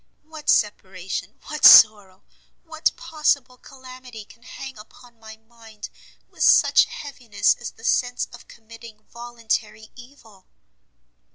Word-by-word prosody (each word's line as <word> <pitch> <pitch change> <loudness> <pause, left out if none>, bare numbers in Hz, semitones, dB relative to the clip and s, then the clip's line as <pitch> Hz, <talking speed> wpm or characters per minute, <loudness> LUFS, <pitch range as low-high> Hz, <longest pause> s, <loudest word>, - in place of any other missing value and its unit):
What 310 -1 -10
separation, 190 -3 -3
what 305 -1 -8
sorrow, 200 -3 +6 0.4
what 320 -1 -2
possible 285 -5 -2
calamity 255 -4 -14
can 230 - -21
hang 265 -1 -11
upon 240 +2 -18
my 220 0 -14
mind 220 -1 -14 0.4
with - - -15
such - - +4
heaviness, 245 -7 -2
as 240 - -6
the 225 - -22
sense 245 0 -1
of 240 - -15
committing 225 -1 -16
voluntary 225 -2 -6
evil?" 240 -6 -18
235 Hz, 115 wpm, -21 LUFS, 215-255 Hz, 0.4 s, sorrow